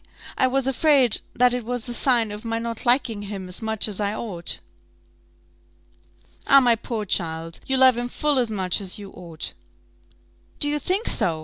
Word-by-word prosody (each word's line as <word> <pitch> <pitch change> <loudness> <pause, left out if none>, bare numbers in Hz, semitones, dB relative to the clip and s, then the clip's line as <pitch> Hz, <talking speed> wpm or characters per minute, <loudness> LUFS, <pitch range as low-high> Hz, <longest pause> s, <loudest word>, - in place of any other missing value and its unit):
I 260 - +3
was 265 0 0
afraid 270 -3 +3
that 250 0 +4
it 250 -1 -2
was 245 +1 -4
a 240 - -3
sign 235 -4 +2
of 210 +1 -8
my 230 0 -2
not 230 0 -5
liking 240 -4 +2
him 200 -2 -6
as 180 +4 -6
much 220 -1 +1
as 210 -2 -3
I 205 +1 -1
ought." 185 -8 0 1.9
"Ah, 275 - +8
my 245 -3 +3
poor 225 -1 -5
child! 165 -3 -3
you 265 - +1
love 260 -2 +5
him 245 0 -3
full 295 +1 0
as 240 -3 0
much 190 -3 0
as 190 -2 -2
you 200 -2 -10
ought." 170 -3 -4 1.1
"Do 290 - +2
you 295 0 0
think 380 - -1
so? 160 -3 +2
230 Hz, 185 wpm, -23 LUFS, 200-255 Hz, 1.9 s, Ah